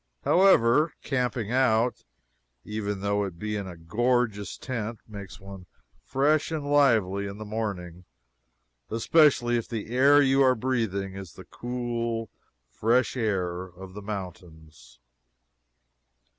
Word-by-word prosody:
However, 155 -5 +4
camping 125 -5 -1
out, 120 -2 +2 0.6
even 105 -2 -4
though 100 0 0
it 95 -4 -6
be 105 +3 -3
in 100 -2 -4
a 90 -2 -9
gorgeous 110 +3 0
tent, 115 -3 -4
makes 100 -3 -9
one 95 -2 -11 0.4
fresh 145 - +1
and 155 -3 -3
lively 110 -9 +3
in 100 +1 -7
the 110 - -7
morning 95 -5 -5 0.8
especially 120 0 +3
if 115 - -4
the 115 -1 -5
air 140 +3 +6
you 135 -1 +4
are 130 -1 +5
breathing 110 -6 -2
is 95 -3 -8
the - - -12
cool, 120 -2 -4 0.4
fresh 115 - +1
air 95 -7 -1
of 95 +1 -12
the 105 - -8
mountains. 80 - -9
110 Hz, 125 wpm, -27 LUFS, 95-125 Hz, 0.8 s, air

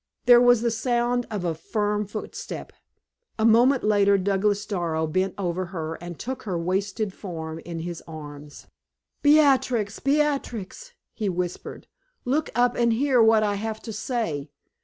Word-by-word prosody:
There 245 -1 +8
was 245 -2 +5
the 235 - +1
sound 240 +2 0
of 205 -4 -3
a 170 - 0
firm 210 +5 -2
footstep; 210 +1 -7 0.6
a 220 - +1
moment 245 +4 +5
later 200 -1 +4
Douglas 200 +2 0
Darrow 170 -6 -1
bent 185 +5 -1
over 185 -1 -2
her 165 -3 -4
and 175 -2 -7
took 260 +2 -5
her 190 -5 -3
wasted 195 +4 -2
form 160 -5 -6
in 165 0 -6
his 170 0 -6
arms. 145 -2 -10 0.6
"Beatrix, 265 -8 +3
Beatrix!" 285 - -1 0.2
he 210 -3 -2
whispered, 180 -1 -4 0.4
"look 285 +5 0
up 245 0 +3
and 235 -1 +2
hear 260 0 +3
what 220 -1 +5
I 205 -1 +1
have 215 +2 -4
to 225 - -6
say. 205 - -3
210 Hz, 150 wpm, -25 LUFS, 175-240 Hz, 0.6 s, There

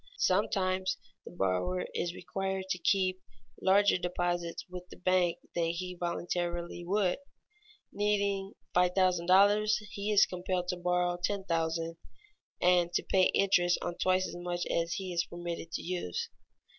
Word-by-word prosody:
Sometimes 185 - +1 0.3
the - - -9
borrower 175 - 0
is 175 0 -2
required 190 -1 -3
to 185 - -1
keep 185 +1 +1 0.4
larger 200 0 +4
deposits 175 -1 -2
with 180 0 -9
the - - -11
bank 180 -2 +2 0.2
than 170 -1 +1
he 175 +2 -3
voluntarily 175 0 -3
would. 190 +3 +1 0.7
Needing 200 -1 0 0.2
$5000, 185 +3 +4 0.2
he 205 +1 -3
is 205 - +6
compelled 180 0 -3
to 180 - -1
borrow 180 0 +1
$10,000 165 -3 -1 0.6
and 175 -1 +3
to - - +1
pay 190 -1 +3
interest 180 -3 +3
on 175 - -2
twice 185 0 +2
as - - -8
much 175 0 -3
as 170 0 0
he 185 -2 -4
is 170 0 +1
permitted 170 -1 -6
to - - -3
use. 175 - -3
180 Hz, 135 wpm, -31 LUFS, 175-190 Hz, 0.7 s, is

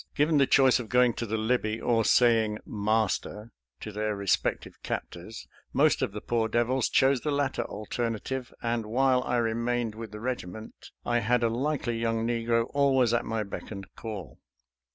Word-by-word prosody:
Given 150 +1 +3
the 135 - +4
choice 130 -2 +5
of 115 -3 -7
going 125 -1 +4
to 115 - -4
the 110 +2 -1
Libby 110 -1 0
or 115 -2 +2
saying 110 -3 +3
"master" 110 +1 -1 0.3
to 110 - -6
their 105 0 -2
respective 100 -2 -1
captors, 90 +6 -6 0.3
most - - +3
of - - 0
the 105 +1 -6
poor 115 -2 0
devils 120 +3 +1
chose 135 -1 +3
the 150 - -2
latter 140 -2 0
alternative, 115 +4 -4
and 115 -2 -1
while 130 +2 +2
I 125 - -1
remained 115 0 0
with 110 -1 -8
the 105 - -8
regiment 110 -4 -6 0.2
I 120 0 +2
had 120 +2 +1
a 115 - +3
likely 120 -1 -1
young 115 -1 0
negro 115 0 +1
always 135 -4 +3
at 120 - +1
my 110 -1 -2
beck 100 - -7
and 100 -2 -7
call. 100 - -7
115 Hz, 175 wpm, -28 LUFS, 110-125 Hz, 0.3 s, choice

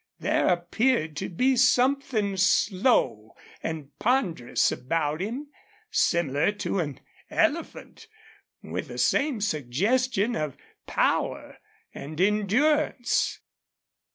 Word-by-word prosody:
There - - +1
appeared 175 0 +1
to - - -3
be 255 +9 +2
something 250 -4 +2
slow 185 - +2 0.3
and 155 -3 -5
ponderous 200 - +1
about 150 +3 -2
him, 250 +9 -4 0.4
similar 150 0 +2
to 200 -2 -2
an 145 -5 -4 0.3
elephant, 330 +6 -2 0.6
with - - -5
the - - -8
same 275 -6 +1
suggestion 205 - 0
of 150 - -3 0.3
power - - -1 0.3
and 155 +3 -8
endurance. 235 +8 +1
200 Hz, 95 wpm, -26 LUFS, 155-255 Hz, 0.6 s, be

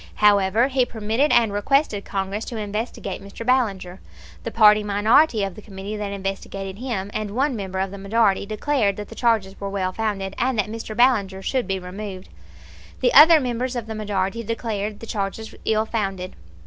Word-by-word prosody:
However, 205 +3 +4
he 265 -2 +2
permitted 230 +5 0
and 225 -4 +4
requested 210 0 +1
Congress 195 +2 -3
to 235 - -6
investigate 210 -1 -4
Mr. 200 +3 -9
Ballinger. 200 -8 0 0.4
The - - -3
party 215 -2 +6
minority 215 +4 +3
of 195 -2 -3
the 215 - -11
committee 200 0 -7
that 205 -1 -4
investigated 195 0 -5
him, 215 -6 -3
and 215 -1 -3
one 270 +1 +1
member 190 -3 -5
of 190 0 -1
the 200 - -8
majority, 200 0 +1
declared 215 -1 0
that 210 -1 -7
the - - -9
charges 220 -6 0
were 200 - -3
well 190 -2 -1
founded 200 -3 -2
and 255 -1 +1
that 210 0 0
Mr. 225 -1 -6
Ballinger 205 -6 +2
should 255 -3 -1
be 195 -1 -1
removed. 185 +1 -7 0.7
The 245 - +3
other 315 +3 +9
members 250 -1 -2
of 240 -2 -3
the 220 - -6
majority 205 0 -2
declared 215 -2 -4
the - - -7
charges 215 +1 -4
ill 220 0 +2
founded. 195 -5 -3
210 Hz, 180 wpm, -23 LUFS, 195-230 Hz, 0.7 s, other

